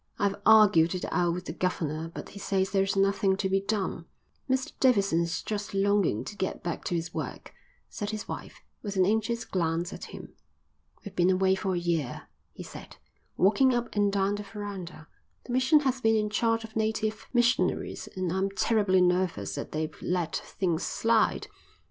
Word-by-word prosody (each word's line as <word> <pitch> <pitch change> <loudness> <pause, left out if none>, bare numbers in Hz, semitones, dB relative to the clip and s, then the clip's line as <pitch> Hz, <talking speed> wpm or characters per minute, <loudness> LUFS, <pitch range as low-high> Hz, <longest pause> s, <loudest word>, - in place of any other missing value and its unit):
"I've 200 0 0
argued 200 -6 +6
it 180 - -3
out 175 -1 +1
with 180 0 -6
the - - -5
governor, 165 -3 -2
but - - -8
he 200 - -10
says 190 -1 0
there 195 -1 +3
is 195 +1 0
nothing 195 0 +2
to 195 - 0
be 195 0 +1
done." 195 -5 -2 0.4
"Mr 260 0 0
Davidson's 195 -9 +2
just 205 -2 -4
longing 195 - +2
to 210 - -8
get 190 -1 -3
back 170 -1 -3
to 175 - -1
his 165 0 -3
work," - - -6 0.3
said 205 -2 -5
his 215 0 -5
wife, - - -7 0.2
with 200 -2 -5
an 185 -1 +4
anxious 220 +3 0
glance 170 0 -1
at - - -7
him. - - -10 0.7
"We've 205 - -8
been 175 +1 +3
away 190 0 +3
for 190 -1 -1
a - - 0
year," 170 -7 -2 0.2
he - - -9
said, - - -11 0.4
walking 250 +7 +4
up 240 -2 -3
and 205 -1 +3
down 195 0 +1
the 205 - -3
verandah. 195 -6 -7 0.4
"The 245 - -5
mission 260 +4 +4
has 265 -2 0
been 225 -1 +4
in 210 -1 0
charge 225 +1 +1
of 220 -1 -11
native 220 -1 -1
missionaries 240 0 +1
and 185 -2 -1
I'm 190 +1 0
terribly 195 -2 +2
nervous 180 0 +1
that - - -5
they've 155 0 -3
let 175 -2 -1
things 175 -4 -2
slide. 225 +1 +1
195 Hz, 185 wpm, -28 LUFS, 180-215 Hz, 0.7 s, argued